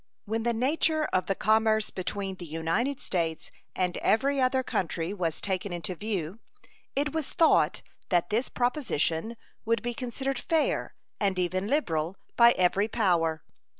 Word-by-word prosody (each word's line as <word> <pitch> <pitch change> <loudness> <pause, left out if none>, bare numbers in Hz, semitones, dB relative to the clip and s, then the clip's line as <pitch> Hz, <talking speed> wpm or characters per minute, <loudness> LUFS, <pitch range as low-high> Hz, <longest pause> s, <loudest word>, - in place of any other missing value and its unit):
When 225 +2 -1
the 235 +1 +1
nature 305 +6 +1
of 185 - +1
the 195 - +1
commerce 220 +1 +2
between 195 0 -3
the 175 - -8
United 165 - -1
States 165 -3 -2 0.2
and 180 -1 0
every 275 +4 +2
other 260 0 +2
country 170 -4 -2
was 170 -6 -2
taken 190 0 -2
into 175 +1 -3
view, 195 -1 -4 0.6
it 285 +1 0
was 320 -3 -2
thought 325 - +3 0.3
that 175 0 +1
this 230 +5 0
proposition 235 - 0 0.3
would 230 -1 0
be 240 0 -2
considered 260 +2 -3
fair, 325 -3 0 0.2
and 195 -3 +1
even 185 +2 0
liberal, 180 - 0 0.2
by 235 0 +7
every 190 +3 +2
power. 170 -8 +1
205 Hz, 150 wpm, -28 LUFS, 180-245 Hz, 0.6 s, by